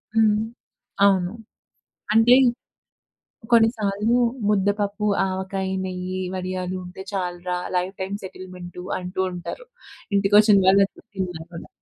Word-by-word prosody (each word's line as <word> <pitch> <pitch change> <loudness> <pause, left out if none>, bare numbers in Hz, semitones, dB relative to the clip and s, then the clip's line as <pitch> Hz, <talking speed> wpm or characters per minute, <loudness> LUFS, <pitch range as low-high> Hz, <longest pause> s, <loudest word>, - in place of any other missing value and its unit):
హ్మ్. 220 -1 +5 0.7
అవును. 190 -1 +3 0.8
అంటే 225 +3 +6 1.2
కొన్ని 225 -1 +7
సార్లు 210 +3 +1 0.3
ముద్దపప్పు, 205 +1 +1 0.2
ఆవకాయి, 190 0 -3
నెయ్యి, 185 0 -4
వడియాలు 185 0 -3
ఉంటే 180 +2 -9
చాలురా 180 -1 -3 0.2
లైఫ్ 180 +2 -1
టైమ్ 195 +2 -3
సెటిల్మెంటు 180 -1 -9 0.2
అంటూ 180 +1 -5
ఉంటారు. 180 - -7 0.5
ఇంటికొచ్చిన 205 +1 +5
వాళ్ళందరు 195 +1 +3
తిన్నాకూడా. 175 -3 -6
190 Hz, 95 wpm, -23 LUFS, 180-205 Hz, 1.2 s, కొన్ని